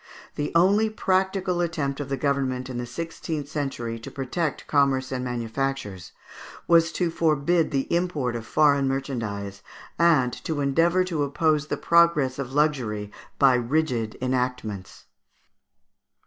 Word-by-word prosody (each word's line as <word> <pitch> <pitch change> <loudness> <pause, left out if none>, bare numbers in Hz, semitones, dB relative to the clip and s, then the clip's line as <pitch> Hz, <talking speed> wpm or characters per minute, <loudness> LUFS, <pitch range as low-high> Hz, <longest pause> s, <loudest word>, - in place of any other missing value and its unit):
The 145 0 -3
only 200 +6 +4
practical 190 -3 0
attempt 150 -5 -2
of 145 -1 -5
the 135 - -1
government 130 -2 -1
in 120 - -4
the 120 - -4
sixteenth 160 +1 -5
century 120 -6 -4
to 115 - -8
protect 140 +4 -3
commerce 135 -2 +1
and 130 -1 -2
manufactures 120 -4 -3 0.6
was 165 -1 +5
to 175 -2 0
forbid 160 +1 +2
the 135 -1 0
import 155 -9 -1
of 115 -2 -6
foreign 140 0 +3
merchandise, 110 -8 -3 0.4
and 155 -8 +4
to 155 -3 -2
endeavour 165 +6 +2
to 170 -5 -2
oppose 150 +1 +1
the - - -2
progress 170 -6 +3
of 130 -2 -4
luxury 125 -9 0 0.3
by 135 -2 +5
rigid 125 -3 0
enactments. 125 -6 -3
140 Hz, 135 wpm, -25 LUFS, 125-165 Hz, 0.6 s, was